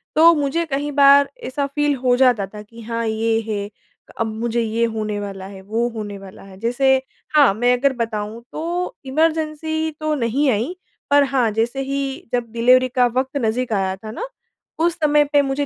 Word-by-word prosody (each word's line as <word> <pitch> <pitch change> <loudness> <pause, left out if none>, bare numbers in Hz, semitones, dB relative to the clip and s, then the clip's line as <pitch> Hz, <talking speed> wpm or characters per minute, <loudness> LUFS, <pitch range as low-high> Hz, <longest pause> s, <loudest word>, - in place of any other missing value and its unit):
तो 330 +2 +7
मुझे 290 +3 0
कही 290 -1 -2
बार 280 0 +6
ऐसा 280 +2 -2
फ़ील 295 +1 0
हो 250 -1 +4
जाता 245 -6 +3
था 210 +2 -10
कि 230 +2 -14
हाँ, 230 +1 -3
ये 225 +1 +1
है 205 -2 -3 0.5
अब 230 - +1
मुझे 230 +2 -2
ये 230 +1 0
होने 215 -1 -3
वाला 195 -2 -6
है, 195 0 -10
वो 225 +5 -1
होने 205 -2 -5
वाला 195 -1 -12
है 195 -1 -13
जैसे 245 +4 +2 0.4
हाँ, 285 -9 +6
मैं 245 +4 +2
अगर 275 +2 +2
बताऊँ 225 -2 -4
तो 345 +3 -3
इमरजेंसी 315 +2 0
तो 310 0 -1
नहीं 265 +2 +1
आई, 235 - -1 0.3
पर 285 0 +5
हाँ, 260 -4 +1
जैसे 235 +5 -1
ही 275 -2 -4
जब 240 -2 -1
डिलीवरी 250 +2 +4
का 250 0 +3
वक़्त 265 +2 -1
नज़दीक 230 +1 -1
आया 190 -1 0
था 215 +3 -9
ना, 480 - -5 0.5
उस 340 0 +2
समय 295 -1 +4
पे 290 - +6
मुझे 275 +1 -1
245 Hz, 190 wpm, -20 LUFS, 220-285 Hz, 0.5 s, तो